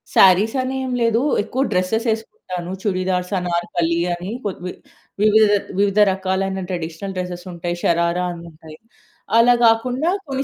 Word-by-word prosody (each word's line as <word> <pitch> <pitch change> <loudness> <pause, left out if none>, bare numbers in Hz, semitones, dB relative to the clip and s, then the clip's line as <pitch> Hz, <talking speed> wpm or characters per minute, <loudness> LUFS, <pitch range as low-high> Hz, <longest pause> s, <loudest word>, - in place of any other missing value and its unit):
శారీసనేం 255 +8 +3
లేదు. 230 0 +3 0.2
ఎక్కువ 260 +4 -3
డ్రెసెస్ 185 +6 0
వేసుకుంటాను. 185 -5 -4
చుడిదార్స్, 185 -1 -1
అనార్కలి 170 -1 -1
అని 180 +4 -5
కొ 205 - -1 0.2
వి 180 - -3 0.5
వివిధ 215 0 +5 0.3
వివిధ 200 0 +1
రకాలైన 190 0 -2
ట్రెడిషనల్ 170 +2 -5
డ్రెసెస్ 180 0 -5
ఉంటాయి. 175 0 -3
షరార 170 +1 +2
అని 170 -1 -9
ఉంటాయి. 155 0 -14 0.6
అలా 240 +1 +6
కాకుండా 250 +8 +2 0.2
కొన్ని 270 0 -2
190 Hz, 125 wpm, -20 LUFS, 175-225 Hz, 0.6 s, అలా